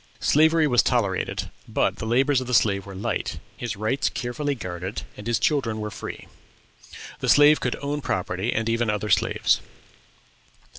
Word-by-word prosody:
Slavery 160 +1 +4
was 125 -5 +4
tolerated, 100 -7 -1 0.2
but - - 0
the 110 - -5
labors 130 +3 +3
of 130 - -6
the 125 - +1
slave 100 -3 +2
were 100 - -8
light, 95 - -3 0.2
his 120 -3 -4
rights 110 +7 0
carefully 140 +4 -3
guarded, 90 -3 -5
and 105 - -9
his 120 -2 +2
children 120 -8 0
were 105 0 -4
free. - - -8 0.9
The - - -2
slave 145 +1 +7
could 125 - -1
own 145 +1 -2
property, 95 +1 -2
and 115 0 -1
even 115 0 +1
other 105 0 -1
slaves. - - +2
115 Hz, 160 wpm, -24 LUFS, 105-140 Hz, 0.9 s, slave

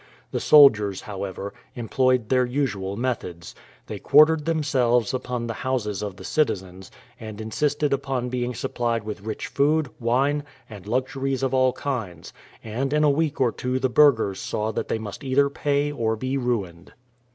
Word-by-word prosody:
The - - -1
soldiers, 110 -10 +5
however, 100 0 -6 0.2
employed 125 0 +1
their 130 -1 +3
usual 110 -7 -2
methods. 90 -9 -4 0.3
They - - -7
quartered 155 +1 +5
themselves 130 -8 +1
upon 125 -2 -3
the 115 - -3
houses 110 -7 -2
of 100 -3 -5
the - - -12
citizens, 95 - -2 0.3
and 110 -1 -8
insisted 145 +6 0
upon 135 -2 -2
being 125 0 -2
supplied 115 -2 -2
with 105 -1 -6
rich 110 +1 -5
food, 145 0 +1
wine, 135 +5 +1 0.2
and 100 -4 -11
luxuries 130 +3 -1
of 135 -1 0
all 130 -1 +3
kinds; 110 -12 -5 0.3
and 125 +6 -3
in 150 0 +3
a 150 - +5
week 150 0 -1
or 125 -3 +3
two 125 +2 -2
the 130 0 0
burghers 120 -8 +4
saw 110 +1 -2
that - - -3
they - - -1
must 105 +1 -8
either 140 +1 +2
pay 145 0 0
or 115 -5 -1
be 130 +4 -3
ruined. 100 -9 -3
125 Hz, 165 wpm, -24 LUFS, 105-140 Hz, 0.3 s, soldiers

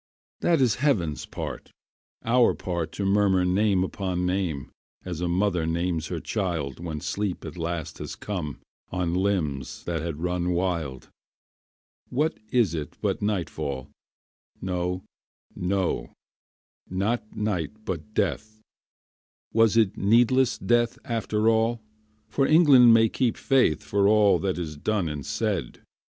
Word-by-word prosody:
That 165 -5 +2
is 120 -5 +3
heaven's 90 - +1
part, - - -6 0.6
our 120 +1 +4
part 85 -3 -3
To 100 - -3
murmur 95 -2 +3
name 95 +1 +2
upon 90 -1 -2
name, 90 -7 -2 0.3
As 85 -2 -4
a 90 - 0
mother 90 -2 +1
names 85 -1 -1
her - - -3
child 80 -9 -2
When 80 -3 -4
sleep 100 +3 -3
at - - -7
last 85 -2 -4
has - - -6
come 85 -9 -5 0.3
On 90 -2 -1
limbs 90 -9 -1
that 85 -3 -2
had 80 -2 -4
run 90 0 0
wild. 85 -7 -2 1.0
What 150 +5 0
is 115 -9 +2
it 75 -3 -5
but - - -1
nightfall? 80 -10 -3 0.7
No, 90 0 -2 0.5
no, 90 -9 -1 0.8
not 105 +4 -2
night 105 -1 -3
but 95 +4 -5
death; 100 +5 -1 0.9
Was 115 -1 +4
it 110 -4 +3
needless 120 +4 +3
death 120 +3 +1
after 110 -2 0
all? 115 +1 +3 0.5
For 135 - +1
England 145 -7 +7
may 115 0 +6
keep 120 +1 0
faith 130 - +2
For 100 0 +2
all 105 -1 +5
that 95 -2 -1
is 80 -4 -5
done 100 +2 0
and 75 -2 -4
said. - - -2
95 Hz, 135 wpm, -26 LUFS, 85-110 Hz, 1.0 s, England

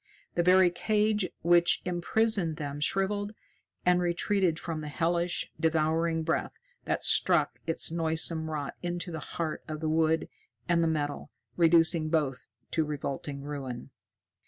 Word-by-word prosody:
The 175 - +1
very 180 0 +5
cage 210 +1 +1
which 175 0 +4
imprisoned 180 0 +1
them 145 -1 -5
shriveled 205 +6 0 0.5
and 180 0 +4
retreated 175 0 +1
from 165 -2 -5
the 150 - -6
hellish, 170 +3 -1
devouring 160 0 +1
breath 305 - -2 0.3
that - - -1
struck - - +3
its 165 0 +1
noisome 160 -1 +1
rot 150 -3 -4
into 175 0 -4
the 160 - -5
heart 160 +1 -4
of 155 -1 -5
the 160 0 -2
wood 160 0 +1 0.4
and 170 -1 +2
the - - +2
metal, 145 -2 -2 0.3
reducing 165 -1 +4
both 145 -5 -1 0.2
to 160 - +1
revolting 140 -1 -5
ruin. 135 -4 -6
165 Hz, 135 wpm, -29 LUFS, 155-175 Hz, 0.5 s, very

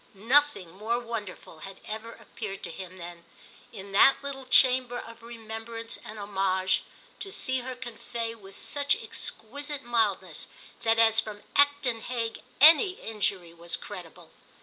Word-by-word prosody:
Nothing 240 -3 +3
more 215 +6 -1
wonderful 220 -8 -7
had 195 +4 -10
ever 220 +2 -6
appeared 195 -3 -8
to - - -4
him 185 +1 -9
than, 170 -1 -9 0.5
in 200 -3 -9
that 205 +7 +7
little 270 -2 -6
chamber 255 -1 +5
of 230 -1 -9
remembrance 230 0 -7
and 220 -2 -9
homage, 190 -2 +1 0.4
to 390 - -5
see 260 -7 +1
her 255 +1 -5
convey 235 -1 -5
with 195 -3 -12
such 285 -1 +1
exquisite 285 +6 -4
mildness 205 -8 0 0.3
that 225 0 +3
as 225 -1 +6
from 210 -2 -4
Acton 285 -5 +3
Hague 230 -2 -3 0.2
any 320 +6 +8
injury 200 - -2
was 170 0 -3
credible. 180 -5 -10
225 Hz, 140 wpm, -28 LUFS, 195-250 Hz, 0.5 s, any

